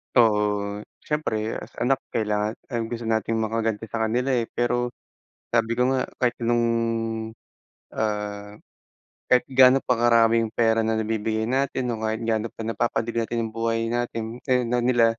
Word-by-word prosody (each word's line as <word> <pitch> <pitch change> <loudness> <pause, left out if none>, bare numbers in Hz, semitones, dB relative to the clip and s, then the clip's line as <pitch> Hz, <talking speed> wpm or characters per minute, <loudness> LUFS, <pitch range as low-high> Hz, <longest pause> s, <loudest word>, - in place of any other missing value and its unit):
Oo. 105 -3 +2 0.3
Siyempre 150 -7 -1 0.2
as - - -11
anak 130 +2 +2
kailangan 105 -1 0 0.2
ang 115 -2 -1
gusto 120 0 -4
nating 115 0 0
makaganti 110 0 -1
sa 110 +1 -2
kanila, 125 +4 0
eh. 120 -2 +1
Pero 120 0 0 0.6
sabi 115 -1 +2
ko 125 +1 +3
nga, 130 - +1 0.2
kahit 125 -1 +2
nung, 120 0 +2 1.3
ah, 105 -1 -3 0.7
kahit 125 -1 +4
gaano 130 0 +7
pa 125 - +2
karaming 115 -1 +4
pera 115 0 +2
na 110 0 +1
nabibigay 110 0 -1
natin 130 -1 0
o 115 - -3
kahit 110 0 -1
gaano 110 0 0
pa - - -9
napapadali 115 +1 -1
natin 115 +1 -2
yung 110 - -11
buhay 115 0 0
natin, 120 -1 -3
ay, 125 -1 +3
na 125 +1 +1
nila, 120 -2 +4
115 Hz, 155 wpm, -24 LUFS, 110-120 Hz, 1.3 s, gaano